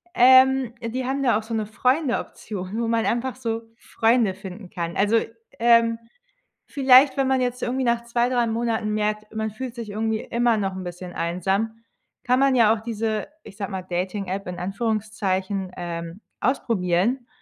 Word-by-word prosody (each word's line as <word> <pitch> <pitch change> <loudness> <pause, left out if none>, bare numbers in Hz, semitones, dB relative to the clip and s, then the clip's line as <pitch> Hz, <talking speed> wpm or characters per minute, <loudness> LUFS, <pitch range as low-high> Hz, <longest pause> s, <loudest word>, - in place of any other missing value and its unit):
ähm, 260 -1 +6
die 245 +3 -3
haben 270 +2 -1
da 240 -5 +3
auch 220 - -4
so 230 - -7
'ne 215 -2 -1
Freunde-Option, 225 - -2
wo 230 - -1
man 230 -1 +1
einfach 245 +2 -1
so 230 -2 -3 0.2
Freunde 225 -4 +1
finden 190 0 -10
kann. 170 -4 -4
Also, 210 +3 +3 0.4
ähm, 230 -1 +4 0.7
vielleicht, 265 -1 +5
wenn 270 -1 +1
man 265 -1 +2
jetzt 250 0 -2
irgendwie 255 +2 -1
nach 235 0 +1
2, 235 +1 +1
3 245 -2 +1
Monaten 225 -2 -1
merkt, 210 0 -2
man 220 -1 -3
fühlt 250 +2 -6
sich 230 -3 -6
irgendwie 220 +1 -1
immer 235 -1 +1
noch 195 -2 -1
'n 190 - -6
bisschen 180 0 -7
einsam, 195 +7 -2 0.4
kann 250 +1 +2
man 275 -1 +4
ja 225 -2 +5
auch 215 - -6
diese, 220 -1 -2 0.2
ich 195 - -12
sage 200 -2 -4
mal, 190 -1 -4
Dating-App 185 +1 -3
in 180 -1 -6
Anführungszeichen, 195 -1 -2
ähm, 170 +1 -6 0.2
ausprobieren 230 0 0
225 Hz, 170 wpm, -24 LUFS, 195-240 Hz, 0.7 s, ähm